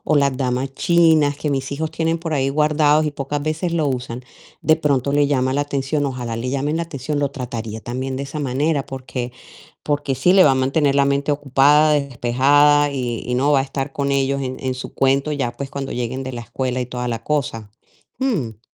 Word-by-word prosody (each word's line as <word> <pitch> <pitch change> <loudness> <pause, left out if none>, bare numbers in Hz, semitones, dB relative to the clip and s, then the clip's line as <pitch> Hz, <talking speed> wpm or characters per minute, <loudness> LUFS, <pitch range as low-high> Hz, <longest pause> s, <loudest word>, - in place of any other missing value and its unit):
las 140 -2 +3
damas 130 +1 -2
chinas 160 -4 +3
que 150 - -2
mis 135 0 -2
hijos 155 +2 -3
tienen 165 +1 0
por 165 -1 -4
ahí 135 -2 +1
guardados, 150 +1 +3
y 150 - -1
pocas 145 +1 -4
veces 160 +3 -2
lo 160 -3 +1
usan, 125 -1 -4 0.4
de 155 - +4
pronto 140 -4 0
le 145 0 +3
llama 130 -2 +1
la 145 - +1
atención. 145 +1 -1
Ojalá 125 -4 -4
le 125 +2 -3
llamen 145 +3 -1
la 170 - -1
atención, 145 -1 -4
lo 140 - 0
trataría 115 -5 -5
también 130 +3 -4
de 135 - -3
esa 140 +2 -6
manera. 140 +2 0
Porque 130 -2 -5 0.5
porque 145 -2 -1
sí 180 +7 +3
le 190 -1 +7
va 145 - +6
a - - +3
mantener 135 +2 +1
la 140 0 +3
mente 140 +1 +1
ocupada, 145 +2 +4
despejada, 145 +2 +3
y 125 -4 -3
y 125 - -2
no 135 +4 +2
va 135 - +4
a - - +1
estar 135 0 -4
con 140 -1 -1
ellos 140 0 0
en 130 0 -4
en 130 -1 -2
su 130 - -7
cuento 135 +2 +2
ya, 135 -5 -2
pues, 135 +1 -5
cuando 140 -1 -5
lleguen 125 +2 -3
de 130 0 -6
la 120 -1 -6
escuela 125 +2 -3
y - - -5
toda 125 0 -4
la 115 -1 -4
cosa. 120 -8 -2 0.5
Mm. 155 - -2
140 Hz, 215 wpm, -20 LUFS, 130-145 Hz, 0.5 s, le